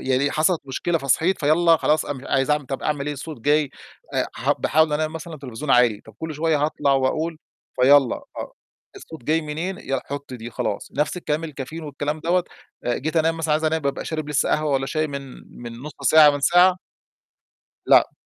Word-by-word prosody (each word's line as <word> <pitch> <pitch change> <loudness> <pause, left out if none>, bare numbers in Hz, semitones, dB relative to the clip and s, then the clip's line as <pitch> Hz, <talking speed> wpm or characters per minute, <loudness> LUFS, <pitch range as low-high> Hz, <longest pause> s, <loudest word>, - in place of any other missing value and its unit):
يعني 135 +2 +2
حصلِت 160 +2 +1
مشكلة 165 +5 -1
فصحيت 160 +7 +1
فيلّا 165 +3 +4
خلاص 155 0 +1
أن 145 - -4
مش 130 - -11
عايز 135 0 +1
أعمل 150 -2 +1
طَب 135 - -4
أعمل 145 -2 -1
إيه 150 - -1
الصوت 145 -2 -8
جاي 145 +1 +2 0.4
آآ - - +1
ح - - +1
باحاول 160 +1 +2
أنام 155 +1 -1
مثلًا 160 +1 -7
التليفزيون 140 -1 -6
عالي، 120 -5 +4
طَب 110 - -16
كلّ 160 -1 -5
شوية 155 -1 +1
هاطلع 145 -2 +1
وأقول، 155 +5 0 0.4
فيلّا 135 -1 +5 0.2
آه، - - -6 0.4
الصوت 160 -7 -11
جاي 160 +4 +2
منين 165 +5 -4
يلّا 135 -1 -3
حُط 140 -1 -6
دي 120 0 -8
خلاص، 100 - -3
نَفْس 150 +4 -1
الكلام 160 -2 -2
الكافيين 155 +1 -7
والكلام 150 +1 -4
دَوّة 175 +2 +1 0.4
آآ 120 0 0
جيت 155 +4 -3
أنام 165 +1 +2
مثلًا 160 -2 -1
عايز 155 +1 +1
أنام 160 0 +1
بابقى 140 -1 -2
شارب 155 -2 -4
لسّه 150 -2 +1
قهوة 155 -1 +1
والّا 135 0 0
شاي 155 +1 -1
من 140 -2 -5 0.4
من 120 -1 -7
نُص 150 +1 -7
ساعة 155 -2 +7
من 145 0 -3
ساعة 180 +5 +5 1.1
لأ. - - +5
150 Hz, 195 wpm, -23 LUFS, 140-160 Hz, 1.1 s, ساعة